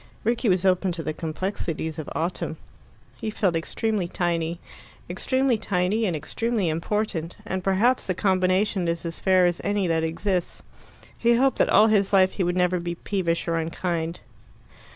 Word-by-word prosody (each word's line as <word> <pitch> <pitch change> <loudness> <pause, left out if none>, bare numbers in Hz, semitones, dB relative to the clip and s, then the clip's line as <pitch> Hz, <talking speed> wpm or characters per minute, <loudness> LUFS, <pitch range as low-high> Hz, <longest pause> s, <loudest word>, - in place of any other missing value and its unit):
Rickie 235 +1 +1
was 185 0 +2
open 185 0 +2
to 165 -1 -5
the 155 - -2
complexities 160 -1 -3
of 155 - -5
autumn; 170 +3 -2 0.6
he 220 - -3
felt 195 -5 0
extremely 200 +3 -1
tiny 170 -1 -1 0.5
extremely 260 -3 0
tiny 200 +4 0
and 175 - -1
extremely 210 +5 -1
important; 170 0 -2
and 190 -1 -3
perhaps 210 +7 +2
the 185 - 0
combination 185 0 +1
is 170 0 -2
as 165 0 -5
fair 185 -1 +4
as 175 -1 0
any 205 -1 0
that 165 -2 +1
exists. 175 +3 -2 0.5
He 235 0 +3
hoped 265 +2 +2
that - - +3
all 210 - +6
his 205 -3 +2
life 190 -1 +5
he 190 - -2
would 175 +1 0
never 180 0 +2
be 170 0 -4
peevish 170 -3 -2
or 165 0 +1
unkind. 165 0 -2
185 Hz, 165 wpm, -25 LUFS, 170-205 Hz, 0.6 s, all